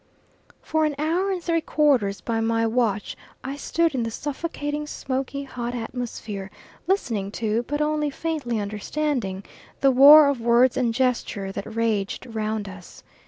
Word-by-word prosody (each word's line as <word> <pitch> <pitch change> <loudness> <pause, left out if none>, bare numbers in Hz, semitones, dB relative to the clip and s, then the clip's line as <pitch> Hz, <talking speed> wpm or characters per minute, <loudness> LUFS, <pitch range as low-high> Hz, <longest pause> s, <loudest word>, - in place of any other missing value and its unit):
For 315 0 0
an 305 -2 0
hour 335 +6 0
and 365 -2 -3
three 330 -1 +1
quarters 265 -12 +2
by 230 -1 -1
my 225 0 +1
watch 225 -3 0 0.3
I 270 +2 -4
stood 330 +2 0
in 255 - -1
the 230 - -1
suffocating, 295 +3 -4
smoky, 275 0 -3
hot 245 -2 -5
atmosphere 225 -4 -5 0.4
listening 230 - 0
to, 225 0 0
but 290 +1 -1
only 300 0 +1
faintly 285 -6 -2
understanding, 210 0 -2 0.4
the 275 - +5
war 285 +3 +9
of 280 -4 0
words 240 +2 +4
and 245 -3 +1
gesture 235 -5 -1
that 200 +3 -7
raged 220 -2 -1
round 220 -3 -3
us. 185 -2 -12
250 Hz, 150 wpm, -24 LUFS, 220-295 Hz, 0.4 s, war